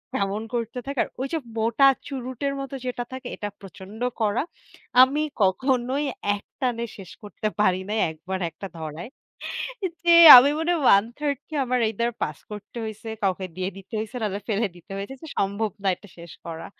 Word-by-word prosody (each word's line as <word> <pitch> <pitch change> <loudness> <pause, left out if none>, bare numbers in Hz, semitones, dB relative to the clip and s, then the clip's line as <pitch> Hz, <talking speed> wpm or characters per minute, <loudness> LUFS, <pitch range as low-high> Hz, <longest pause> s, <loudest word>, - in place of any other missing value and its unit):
কেমন 200 +2 -1
করতে 230 +1 -3
থাকে। 275 -2 -4
আর - - -13
ওইসব 280 +3 -2
মোটা 230 +5 +4 0.2
চুরুটের 265 +1 -3
মতো 275 0 -6
যেটা 245 -1 -2
থাকে 260 -1 -7
এটা 205 - -4
প্রচন্ড 195 +2 -11 0.2
কড়া। 215 +2 +1 0.6
আমি 275 +4 +4 0.2
কখনোই 255 +8 +1 0.3
একটানে 235 +3 -3
শেষ 195 -3 -10
করতে 205 +1 -4
পারিনাই 195 +2 +1
১ 160 - -8
বার 190 0 -1
১ - - -30
টা 195 - -4
ধরায়। 160 +6 -6 0.9
যে 345 - +3 0.3
আমি 260 +3 +8
মনে 325 +2 +1
হয় - - -2
1/3 280 +7 -3
কি 315 - -9
আমার 250 -1 0
এইদার 235 +2 -1
পাস - - -2
করতে 210 +2 -10
হইছে, 220 +1 -8
কাউকে 190 -1 0
দিয়ে 185 +1 -2
দিতে 195 +3 -11
হইছে 220 +3 -5
নাহলে 205 -1 -2
ফেলে 215 +1 +1
দিতে 175 +3 -13
হয়েছে 200 +7 -5
যে - - -8
সম্ভব 200 +2 0
না 195 - +1
এটা 205 - -17
শেষ 170 -1 -10
করা। 165 -1 -6
220 Hz, 175 wpm, -24 LUFS, 195-255 Hz, 0.9 s, আমি